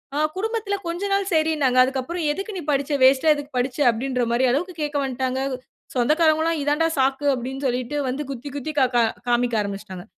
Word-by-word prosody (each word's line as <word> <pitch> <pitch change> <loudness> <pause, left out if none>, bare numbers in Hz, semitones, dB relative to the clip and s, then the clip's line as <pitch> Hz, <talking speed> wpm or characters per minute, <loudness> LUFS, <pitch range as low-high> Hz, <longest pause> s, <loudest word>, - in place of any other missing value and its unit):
ஆ - - -1 0.2
குடும்பத்துல 440 0 -2
கொஞ்சம் 380 +4 -3
நாள் 395 0 0
சரின்னாங்க. 310 -5 +2
அதுக்கப்புறம் 265 +6 -2
எதுக்கு 390 +7 -4
நீ 355 - -4
படிச்ச? 280 +1 -1
வேஸ்ட்டா 265 +4 +5
எதுக்கு 290 0 -7
படிச்ச? 250 0 -1
அப்பிடின்றமாரி 245 0 -1
அளவுக்கு 350 +8 -1
கேக்க 295 -1 -1
வந்துட்டாங்க 260 0 -2 0.6
சொந்தக்காரங்கவுல்லாம் 315 +4 +2
இதுதான்டா 295 +3 +1
சாக்கு 270 +2 +1
அப்பிடின்னு 265 +2 -4
சொல்லிட்டு 250 +3 -2
வந்து 270 +4 -3
குத்தி, 275 +1 -6
குத்தி 290 +2 -4
கா 260 - +5
கா 240 - +5 0.3
காண்பிக்க 240 -1 +1
ஆரம்பிச்சுட்டாங்க. 195 -2 -6
275 Hz, 165 wpm, -23 LUFS, 250-315 Hz, 0.6 s, வேஸ்ட்டா